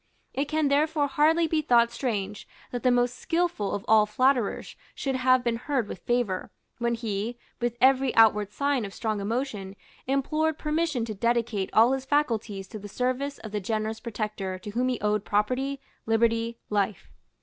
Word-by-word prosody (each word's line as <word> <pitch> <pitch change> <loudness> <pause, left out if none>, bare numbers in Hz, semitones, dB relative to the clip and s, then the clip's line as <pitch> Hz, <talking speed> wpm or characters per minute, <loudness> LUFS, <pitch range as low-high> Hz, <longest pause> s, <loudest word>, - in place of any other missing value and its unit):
It 275 - 0
can 310 0 +1
therefore 300 +1 +2
hardly 315 +4 +3
be 320 -1 +1
thought 235 -5 +4
strange 210 -5 -3 0.2
that 245 - -3
the 250 - +3
most 245 0 +1
skilful 330 - 0
of 200 - -6
all 215 -1 +5
flatterers 255 0 +1 0.2
should 270 - -2
have 255 0 +3
been 235 -1 0
heard 255 -3 -1
with 185 - -7
favour, 240 -6 -1 0.3
when 235 0 +1
he, 225 0 -3 0.2
with 240 -1 -1
every 265 0 +4
outward 210 -2 +5
sign 280 +1 0
of 200 -1 -7
strong 215 -2 -2
emotion, 210 -3 -3 0.3
implored 305 +4 0
permission 300 -6 -1
to 220 - -4
dedicate 230 -2 0
all 230 +3 +5
his 265 0 -1
faculties 230 -9 0
to 215 - -7
the 205 +1 -9
service 255 +5 -2
of 215 - -9
the 210 - -1
generous 220 +2 -2
protector 210 -5 -4
to 205 +3 -8
whom 245 +4 0
he 250 -2 -1
owed 210 -1 +1
property, 255 +7 0 0.3
liberty, 230 +1 +1
life. 200 - -1
235 Hz, 170 wpm, -27 LUFS, 210-270 Hz, 0.3 s, all